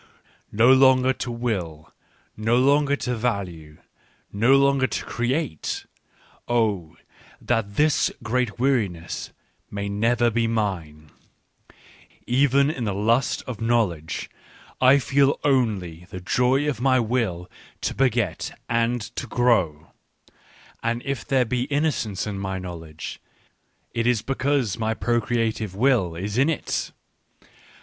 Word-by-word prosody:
"No 115 +5 +5
longer 130 -1 +5
to 125 - -5
will, 95 -10 -4 0.4
no 110 +3 +1
longer 140 +2 +3
to 125 -3 -3
value, 95 -10 -3 0.6
no 115 +7 +4
longer 140 -1 +3
to - - -4
create! 125 - -2 0.6
Oh, 105 -9 0 0.4
that 110 -4 -1
this 150 0 +3
great 120 +1 -1
weariness 105 -11 -1 0.4
may 100 0 -4
never 115 +3 +2
be 115 +1 +1
mine! 85 -9 -3 0.6
" - - -25 0.2
Even 140 +3 +3
in 125 -6 -4
the 100 -2 -1
lust 115 +6 +1
of 120 -4 -6
knowledge, 105 -9 0 0.5
I 130 +2 +7
feel 140 0 +2
only 100 - 0
the 95 - -7
joy 125 +9 +1
of 140 -5 -2
my 130 -1 +4
will 110 -7 -1 0.3
to - - -1
beget 120 -8 0
and 115 +1 +1
to - - -4
grow; 95 -12 +1 0.9
and 115 +1 -1
if 135 -4 -3
there 130 -2 +2
be 125 +2 -1
innocence 140 - -1
in 100 -2 -4
my 95 -1 -3
knowledge, 85 -4 -8 0.7
it 115 0 0
is 120 -3 +2
because 135 -5 0
my 110 0 0
procreative 115 -4 -1
will 110 -7 +2
is 100 +7 -3
in 140 +4 +4
it. 160 - -2
115 Hz, 125 wpm, -24 LUFS, 100-130 Hz, 0.9 s, I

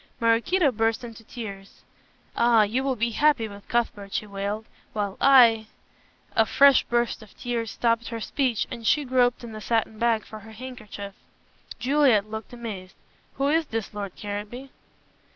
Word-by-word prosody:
Maraquito 250 +8 +3
burst 225 +1 0
into 230 -1 -9
tears. 200 -4 -9 0.5
"Ah, 235 -2 +5
you 235 +6 -1
will 270 -1 0
be 235 +1 0
happy 285 -2 +2
with 200 -1 -12
Cuthbert," 210 -4 -1
she - - -1
wailed, 200 +2 -4 0.3
"while 205 -2 -2
I 235 -5 +6 0.3
" - - -33
a 225 - +4
fresh 275 +3 +6
burst 240 -1 -1
of 215 - -16
tears 235 -2 -3
stopped 230 +1 0
her 230 -1 -5
speech 245 -1 0
and 235 -2 -5
she 295 -1 +3
groped 250 -1 +2
in 235 - -7
the 215 0 -8
satin 220 0 -1
bag 230 -2 +1
for 215 - -9
her 220 +1 -13
handkerchief. 215 -4 -8 0.6
Juliet 250 -6 +3
looked 220 0 -6
amazed. 215 -6 -7 0.4
"Who 275 +1 +1
is 320 +1 +2
this, 225 -2 -4
Lord 200 -3 -6
Caranby?" 210 +6 -6
230 Hz, 165 wpm, -25 LUFS, 215-250 Hz, 0.6 s, I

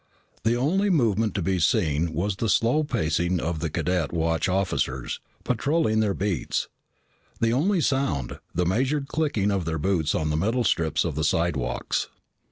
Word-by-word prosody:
The 115 +1 +2
only 185 +11 +1
movement 115 - +2
to 100 - -1
be 95 +1 0
seen 80 +1 +1
was 95 +5 -1
the 115 - -1
slow 120 +9 +3
pacing 85 - 0
of 80 0 -2
the - - -2
cadet 90 -2 -1
watch 80 +1 0
officers, 90 -9 -1 0.2
patrolling 125 -1 +1
their 105 -3 +1
beats; 95 -4 -1 0.7
the 115 0 +2
only 175 +8 +2
sound, 130 - -1
the 90 +2 0
measured 135 - 0
clicking 140 -12 0
of 95 -4 -1
their 80 0 -1
boots 80 -1 0
on 75 -1 0
the 75 - 0
metal 115 +9 +1
strips 80 -6 +1
of 85 - -1
the 80 +2 -2
slidewalks. 75 -5 0
95 Hz, 165 wpm, -25 LUFS, 80-120 Hz, 0.7 s, slow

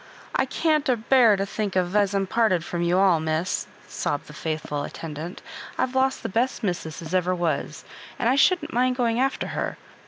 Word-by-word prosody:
^< - - -20 0.3
I 265 - +2
can't 305 +1 +1
abear 240 -2 +5
to 195 0 -1
think 200 -1 -3
as 180 0 0 0.2
I'm 195 0 +1
to - - -15
be - - -13
parted 210 -8 +2
from 175 - -3
you 175 +1 +2
all, 190 -4 +4
miss," 160 +3 -1 0.2
sobbed 145 - -3
the 150 - -12
faithful 150 -2 -3
attendant. 160 +4 -7 0.2
" - - -13
I've 255 - 0
lost 265 0 +1
the - - -1
best 235 +6 -1
missus 170 -4 -3
as 160 +2 -7
ever 185 0 +2
was, 160 -3 -2 0.3
and 235 - 0
I 250 - +4
shouldn't 320 +2 +3
mind 250 +1 +2
going 235 -2 +1
after 270 +1 0
her. - - -3
195 Hz, 210 wpm, -25 LUFS, 170-250 Hz, 0.3 s, abear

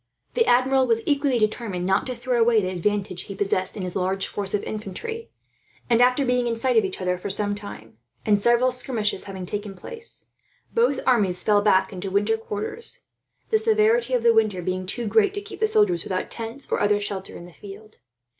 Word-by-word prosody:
The 465 -2 +2
Admiral 260 +1 +4
was 230 -1 +1
equally 280 -3 +2
determined 215 -4 -1
not 190 +5 +1
to 255 - -3
throw 240 0 0
away 230 -1 +5
the 185 -3 -1
advantage 190 0 -2
he 200 - -7
possessed 195 -1 -1
in 195 - -4
his 180 -1 -5
large 190 +1 0
force 200 -1 -3
of 205 - -2
infantry; 445 - -6 0.6
and 235 +1 +5
after 250 +3 +4
being 250 -1 +1
in 230 - 0
sight 250 +2 0
of 220 - +5
each 190 -1 -4
other 180 -1 -1
for 200 - -5
some 205 +1 -1
time, 200 - -9 0.3
and 205 -2 +3
several 240 +4 +3
skirmishes 230 -5 -1
having 190 -2 -6
taken 205 +1 -5
place, 460 - -7 0.4
both 460 - +2
armies 200 -8 +2
fell 205 -1 +4
back 200 -1 +3
into 190 +1 -5
winter 205 +3 +2
quarters 225 - -5 0.5
the 440 - +4
severity 440 - +3
of 240 - 0
the 235 -1 +6
weather 215 -5 +2
being 185 +1 -2
too 235 +5 -2
great 410 - +3
to 410 - -3
keep 420 +1 -10
the 435 - +3
soldiers, 415 -5 +2
without 185 -1 -3
tents 230 +4 -7
or - - +1
other 205 0 +3
shelter, 200 -2 -5
in 170 - -10
the 175 - -14
field. 205 +3 -12
215 Hz, 205 wpm, -24 LUFS, 195-255 Hz, 0.6 s, the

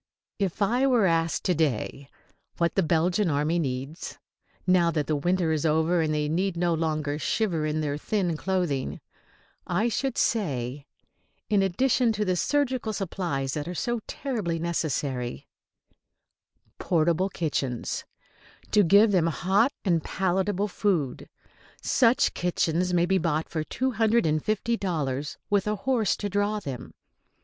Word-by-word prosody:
If 195 +1 0
I 245 +6 +2
were 245 -6 +4
asked 165 -2 +1
to 180 - +2
day 140 -3 -1 0.5
what 170 -1 +1
the 195 - +2
Belgian 175 +3 +2
army 150 +3 +1
needs, 135 +2 -4 0.5
now 180 -2 +4
that 155 -3 -1
winter 175 +2 +1
is 155 -2 0
over 160 +2 +2
and 155 -1 0
they 150 -1 0
need 175 +3 0
no 170 0 +1
longer 155 -2 -1
shiver 170 -6 0
in 155 +1 -1
their 145 -1 -2
thin 180 -2 0
clothing, 175 -6 -1 0.7
I 205 +7 +1
should 265 +3 -2
say, 140 - -1 0.6
in 205 -2 +4
addition 235 +5 +2
to 210 0 -1
the 185 -1 +1
surgical 255 0 0
supplies 170 -9 -2
that 150 0 -3
are 180 - -5
so 240 +5 -1
terribly 215 -12 -2
necessary, 140 -7 -2 1.3
portable 170 +3 +1
kitchens, 140 -9 -2 0.7
to 210 - +5
give 205 +4 +5
them 175 -4 +3
hot 190 - +2
and 170 -5 +2
palatable 190 +2 0
food. 180 -9 -1 0.5
Such 245 -2 +3
kitchens 175 0 0
may 175 -1 +3
be 190 +1 +2
bought 160 -1 0
for 160 -2 -2
two 260 +10 -1
hundred 225 -1 +2
and 155 -1 +1
fifty 215 +2 0
dollars, 145 -8 -2
with 205 0 +2
a 210 - +1
horse 225 0 +1
to 205 - -3
draw 205 +1 0
them. 135 -10 -7
175 Hz, 145 wpm, -26 LUFS, 155-205 Hz, 1.3 s, to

